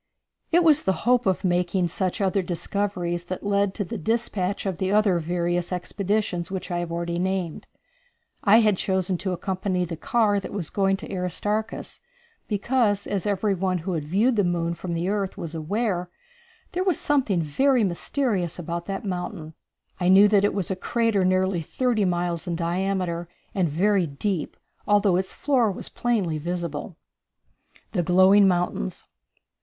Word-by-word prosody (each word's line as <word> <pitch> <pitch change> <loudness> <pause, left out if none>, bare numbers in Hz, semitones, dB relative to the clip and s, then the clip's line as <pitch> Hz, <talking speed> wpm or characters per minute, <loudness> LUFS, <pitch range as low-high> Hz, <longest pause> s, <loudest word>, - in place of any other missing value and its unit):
It 345 +1 +5
was 310 -2 +5
the 190 - +1
hope 245 -1 +3
of 190 - +1
making 180 0 +1
such 185 +4 -2
other 195 0 +2
discoveries 175 -1 -2
that 185 +2 -6
led 200 -1 +1
to 205 - -1
the 175 - -5
dispatch 205 -1 -1
of 190 -3 -2
the 190 0 0
other 205 -4 +3
various 175 +1 -1
expeditions 185 0 -1
which 190 -1 -5
I 175 - 0
have 175 -1 -4
already 170 0 -2
named. 185 -3 -2 0.8
I 220 +3 +6
had 210 -3 +3
chosen 190 -2 0
to 190 0 -2
accompany 185 0 -1
the 165 -1 -5
car 205 +3 +1
that 195 - -8
was 190 -6 -3
going 195 -1 +2
to - - -8
Aristarchus, 205 +4 -3 0.5
because, 210 -1 +1
as 200 0 -2
every 205 0 +1
one 185 0 0
who 180 +2 -3
had 160 -3 -2
viewed 215 +10 +2
the 205 - +4
moon 170 -1 0
from 170 0 -5
the 170 +2 -1
earth 200 -1 -1
was 165 -1 -5
aware, 180 +2 -1 0.6
there 365 +1 -1
was 370 -5 +1
something 260 -11 +1
very 245 - +2
mysterious 190 - -1
about 170 0 -5
that 195 +1 -4
mountain. 180 -3 -4 0.5
I 180 - +1
knew 195 +2 +8
that 200 -1 +4
it 205 - +1
was 195 -2 -1
a - - 0
crater 225 0 +1
nearly 185 -1 +2
thirty 230 +4 0
miles 175 -2 -1
in 170 - -1
diameter 175 0 -1 0.2
and 180 -4 +1
very 185 +3 +2
deep, 160 +4 -3 0.3
although 205 -3 +4
its 190 0 -3
floor 250 -7 +2
was 185 - -7
plainly 200 -10 -1
visible. 170 0 -4 1.0
The 180 - 0
Glowing 190 +4 +5
Mountains. 175 - -1
190 Hz, 165 wpm, -25 LUFS, 175-205 Hz, 1.0 s, knew